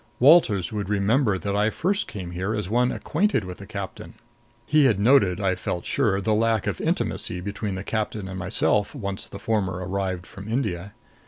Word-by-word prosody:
Walters 120 - +5
would 100 -2 -3
remember 105 +2 +2
that 100 +3 -3
I 105 +1 +3
first 190 - -1
came 90 -4 -6
here 95 +5 -2
as 105 -4 -3
one 125 +4 +2
acquainted 165 - 0
with 90 -1 -8
the 100 - -10
captain. 100 -2 -7 0.5
He 150 -1 +4
had 110 -6 +3
noted, 105 -5 +4
I 95 -2 +1
felt 90 -1 -4
sure, 105 -8 +1
the 105 +2 +1
lack 110 -1 +2
of - - -2
intimacy 90 - -1
between 100 +1 -4
the 95 - -5
captain 105 -2 -3
and 95 0 -6
myself, 100 +5 +1
once 100 -6 -4
the 100 - -9
former 100 -2 0
arrived 95 0 -3
from 105 0 -9
India. 100 -5 -2
100 Hz, 185 wpm, -24 LUFS, 95-115 Hz, 0.5 s, Walters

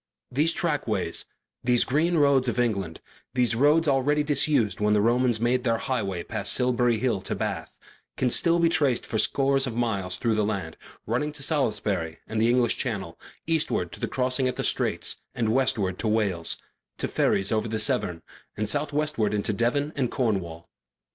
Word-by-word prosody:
These 150 +6 +2
trackways, 115 - -1 0.4
these 120 -1 +3
green 165 +6 +1
roads 140 -3 +4
of 120 - -1
England, 100 -9 -1 0.3
these 125 -2 +2
roads 150 +7 +3
already 145 +2 +2
disused 140 -6 +1
when 105 0 +2
the - - +3
Romans 120 +1 +2
made 120 +2 +1
their 115 -2 +1
highway 100 -8 -2
past 100 +3 -1
Silbury 120 -2 +2
Hill 115 -4 0
to - - -3
Bath, - - -4 0.4
can 125 -1 +1
still 170 +6 +4
be 170 -1 +3
traced 145 -7 +1
for 110 - -2
scores 135 +3 +2
of 115 - -4
miles 100 -6 -1
through 115 -2 0
the 110 0 +1
land, 95 -6 -3 0.3
running 125 +7 -1
to 145 -2 -5
Salisbury 105 - -1
and 110 0 -2
the 115 - +3
English 120 -1 +2
Channel, 100 -10 -4 0.3
eastward 160 -1 0
to - - -10
the - - -2
crossing 130 0 +1
at 125 - -2
the - - -3
Straits - - 0 0.2
and 115 -3 0
westward 115 -8 0
to 110 - -1
Wales, 100 -6 0 0.4
to - - -1
ferries 95 0 +1
over 110 +1 0
the 110 0 -2
Severn, 105 -5 0 0.3
and 105 0 -1
southwestward 145 -7 0
into 105 +1 0
Devon 140 +8 0
and 130 -4 0
Cornwall. 95 -10 -2
120 Hz, 175 wpm, -26 LUFS, 105-135 Hz, 0.4 s, roads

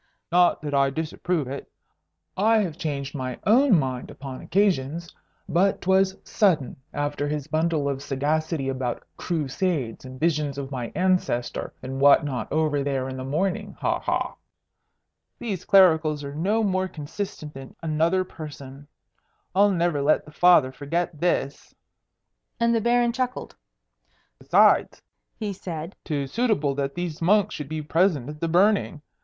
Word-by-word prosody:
"Not 175 -2 +4
that 145 -1 -4
I 140 -1 +3
disapprove 160 +1 -2
it. 135 +2 -7 0.6
I 220 +4 +3
have 185 -8 0
changed 145 -5 -4
my 130 -4 -4
own 235 0 +5
mind 130 -4 -2
upon 135 -1 -8
occasions. 170 -4 0 0.3
But 190 +3 +2
'twas 190 +1 +2
sudden, 170 - +1 0.2
after 145 0 -2
his 150 -1 -3
bundle 160 -1 0
of 135 -1 -2
sagacity 145 +2 -1
about 130 -2 -3
Crusades 155 - -2
and 130 0 -10
visions 150 -4 0
of 140 -1 -5
my 125 -3 -4
ancestor 180 -10 0
and 135 +1 -5
what 145 +1 +7
not 125 -6 -4
over 155 -2 +1
there 135 -2 -1
in 130 - -5
the 130 - -5
morning. 195 +9 -2
Ha! - - 0
ha! - - -2 1.0
These 205 -7 -4
clericals 160 -6 +4
are 140 0 -6
no 200 +9 +1
more 190 -2 +1
consistent 155 -1 -6
than 135 -1 -10
another 165 +4 +1
person. 145 -5 -10 0.7
I'll 200 +2 +5
never 170 -5 +1
let 150 +2 +2
the 150 - -13
Father 175 -5 +5
forget 150 +4 -3
this." 170 -4 -1 0.8
And 235 0 +3
the 230 - +2
Baron 240 +1 +2
chuckled. 255 0 -3 0.8
"Besides," - - +4 0.4
he 210 -2 -4
said, 170 -1 -6
"'tis 140 -5 -3
suitable 210 - +1
that 140 0 -3
these 175 -3 -4
monks 205 +4 +3
should 150 -2 -6
be 155 -1 -4
present 160 -4 +1
at 150 0 -8
the 165 - 0
burning. 180 -3 +2
155 Hz, 150 wpm, -25 LUFS, 140-185 Hz, 1.0 s, what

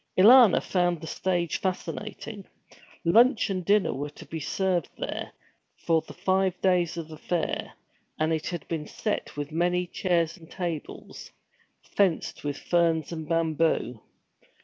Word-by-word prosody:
Alanna 230 +2 +8
found 175 -2 +1
the 160 - -8
stage 175 0 -1
fascinating. 195 +2 -5 0.6
Lunch 225 +4 +4
and 185 -1 -2
dinner 205 +3 +3
were 145 +3 -4
to 145 - -13
be 160 - -6
served 180 +1 -1
there, - - -4 0.5
for 165 -1 +1
the - - -12
five 190 -1 +1
days 180 -2 +2
of 165 -2 -5
the 155 -1 -11
fair, 175 0 -2 0.4
and 155 +1 +1
it 160 0 -2
had 175 -2 -5
been 160 -3 -3
set 210 -8 -3
with 145 +1 -4
many 175 +2 +1
chairs 170 -1 0
and 165 -2 -16
tables, 170 -4 -6 0.5
fenced 190 -5 0
with 145 -1 -3
ferns 165 -3 +1
and 160 -2 -6
bamboo. 160 -7 0
170 Hz, 145 wpm, -27 LUFS, 160-185 Hz, 0.6 s, Alanna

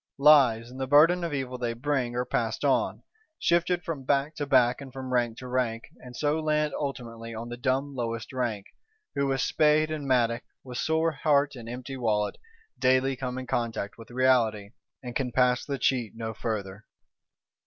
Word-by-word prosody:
Lies, 130 -5 +5
and 130 +1 -8
the 130 - -1
burden 165 +6 +5
of 170 - -2
evil 130 -3 -3
they 120 -1 -1
bring, 125 -1 -1
are 125 +1 0
passed 115 +1 -1
on; 135 - +1 0.3
shifted 175 +1 +1
from 155 -5 -4
back 140 +3 +1
to 145 - -3
back, 125 -1 +4
and 135 -1 -9
from 130 0 -6
rank 120 -2 +1
to 130 - -8
rank; 125 -2 -1 0.2
and 125 -1 -11
so 150 +4 0
land 150 -1 0
ultimately 115 -5 -5
on 115 +2 -6
the 120 - -5
dumb 130 +3 -1
lowest 115 -1 -4
rank, 115 -6 -2 0.5
who 140 0 0
with 135 -1 0
spade 155 0 +3
and 150 -3 -4
mattock, 120 -2 +2 0.2
with 125 -2 -6
sore 160 +1 +1
heart 145 -1 +2
and 115 -2 -9
empty 130 +2 -6
wallet, 105 -4 0 0.4
daily 130 +1 +3
come 125 -1 -4
in 130 - -5
contact 115 -4 -3
with 115 - -12
reality, 120 -5 +2 0.3
and 120 -1 -7
can 130 -3 -1
pass 125 0 +3
the 140 -1 -3
cheat 125 -3 0
no 110 -1 -4
further. 105 -2 -4
130 Hz, 185 wpm, -27 LUFS, 120-140 Hz, 0.5 s, Lies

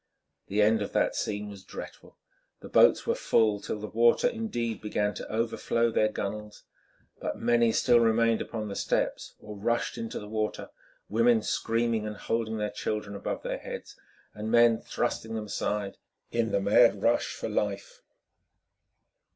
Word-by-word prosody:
The 105 +2 +2
end 110 +1 +3
of 100 - -4
that - - +1
scene 105 0 -2
was 100 -2 -10
dreadful. - - -10 0.4
The - - -10
boats - - +5
were - - +2
full, 105 -2 +2
till 105 - -4
the 105 - -5
water 115 - +3
indeed 220 - -3
began 105 -1 -1
to - - -7
overflow 115 +1 0
their 110 - +3
gunwales, 105 0 -5 0.6
but - - -3
many 120 -1 +3
still 120 +2 +4
remained 115 0 +3
upon 110 -2 -4
the 100 - -5
steps - - -1
or 105 0 -9
rushed 115 +4 -1
into 115 -1 -4
the 105 - -9
water, 110 0 -3 0.4
women 115 0 +3
screaming 115 -1 0
and 105 -1 -6
holding 115 -1 -2
their 105 -1 -2
children 105 -1 -3
above 100 - -4
their - - -3
heads, - - -8 0.4
and 105 +1 -5
men 115 -1 +5
thrusting 110 0 -3
them 110 -1 -3
aside 105 -1 -2 0.3
in 115 -2 0
the 100 - +2
mad 100 +1 +4
rush 120 +1 +2
for - - -4
life. - - -3
110 Hz, 160 wpm, -28 LUFS, 105-115 Hz, 0.6 s, boats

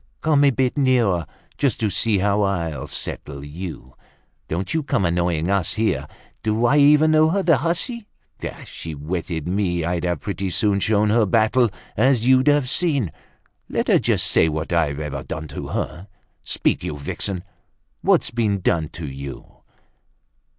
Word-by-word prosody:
Come 150 -3 +3
a - - +6
bit 130 +1 0
nearer, 115 - +2 0.3
just 140 -4 +1
to 105 -2 +1
see 105 +3 +2
how 100 +2 +1
I'll 85 -6 -1
settle 70 -1 -6
you! 75 -4 -8 0.5
Don't 90 +4 -3
you 160 - +1
come 100 -9 0
annoying 85 -1 0
us 100 -2 +1
here. 75 -11 0 0.3
Do 110 +2 0
I 135 +5 +4
even 150 +2 +6
know 155 0 +5
her, 195 +3 0
the 165 -6 +4
hussy? 205 - -1 0.3
If - - -7
she'd 80 -2 -7
wetted 80 +2 -4
me, 90 -2 0
I'd 85 -1 -1
have 90 -1 -1
pretty 95 -1 -3
soon 100 +2 +1
shown 105 +1 +2
her 110 -1 +3
battle, 115 +3 +3 0.3
as 125 0 +3
you'd 130 +1 +4
have 145 -3 +4
seen. 140 - +1 0.6
Let - - -1
her - - +5
just - - +2
say 80 - +4
what 80 +2 -3
I've 75 -4 +1
ever 75 -3 -4
done 75 +2 -6
to - - -6
her. 85 +6 -4 0.3
Speak, - - 0
you 75 - -4
vixen; 90 +5 -3 0.6
what's - - +2
been 110 -4 0
done 80 -3 +1
to 80 -3 -6
you?" 70 0 -8
100 Hz, 165 wpm, -22 LUFS, 80-130 Hz, 0.6 s, a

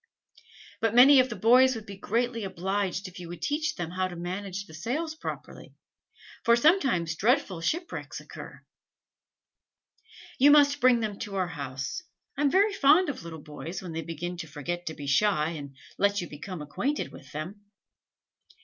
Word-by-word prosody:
But 225 0 0
many 265 +3 +9
of 255 0 +3
the 230 - -5
boys 250 +6 +5
would 220 -2 -7
be 200 - -8
greatly 230 +3 -1
obliged 190 +1 -2
to 185 - -7
you - - -24
if - - -10
you 175 - -8
would 175 0 -9
teach 305 +1 -1
them 170 -1 -4
how 185 +1 -1
to 180 - -8
manage 185 +3 -5
the 160 - -15
sails 275 - -3
properly, 315 - -8 0.7
for 235 - +5
sometimes 235 - +3
dreadful 200 -4 +1
shipwrecks 340 - -3
occur." - - -11 1.7
"You 280 +3 +7
must 290 -1 +5
bring 245 -2 +5
them 210 -2 -3
to 205 -3 -5
our 185 -2 0
house. 135 - -5 0.3
I 285 - -3
am 290 - +4
very 400 +6 +3
fond 320 +1 +5
of 280 - -5
little 160 -3 -9
boys, 165 +5 -7
when 180 - -6
they 165 - -3
begin 165 +3 -5
to 165 - -6
forget 175 +4 -5
to 160 - -3
be 145 - -8
shy, 155 +2 +2
and 145 -4 -7 0.2
let 200 0 +3
you 175 - -4
become 155 +2 -7
acquainted 265 - -2
with 140 +1 -13
them." 175 +8 -6
195 Hz, 180 wpm, -28 LUFS, 170-255 Hz, 1.7 s, many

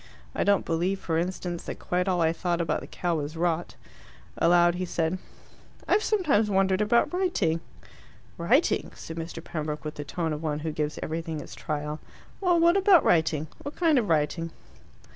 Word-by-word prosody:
I - - 0
don't 200 -2 +3
believe, 175 +4 0
for 165 -1 -1
instance, 175 -1 -3
that - - -5
quite 180 +1 -1
all 180 -2 +1
I 160 0 +3
thought 175 0 -1
about 170 - 0
the - - -9
cow 175 -2 -1
was 150 +2 -4
rot." 170 0 -1 0.6
Aloud 175 0 +4
he 180 +1 -3
said, 170 0 -1 0.7
"I've 425 - +3
sometimes 305 - +2
wondered 190 0 +2
about 235 +9 +2
writing." 355 - +1 0.8
"Writing?" - - +2
said 165 - -8
Mr. 165 0 -6
Pembroke, 155 -3 -4
with 150 - -3
the 145 - -6
tone 160 +2 -2
of 150 - -5
one 150 -2 -1
who 160 0 -2
gives 150 0 -2
everything 160 0 -3
its - - -9
trial. 150 0 -4 0.4
"Well, 355 -3 +3
what 340 +3 +5
about 385 -5 +6
writing? 160 -2 +2 0.2
What 285 - -7
kind 325 -6 +3
of 220 - -2
writing?" 165 +2 +1
170 Hz, 180 wpm, -27 LUFS, 160-195 Hz, 0.8 s, about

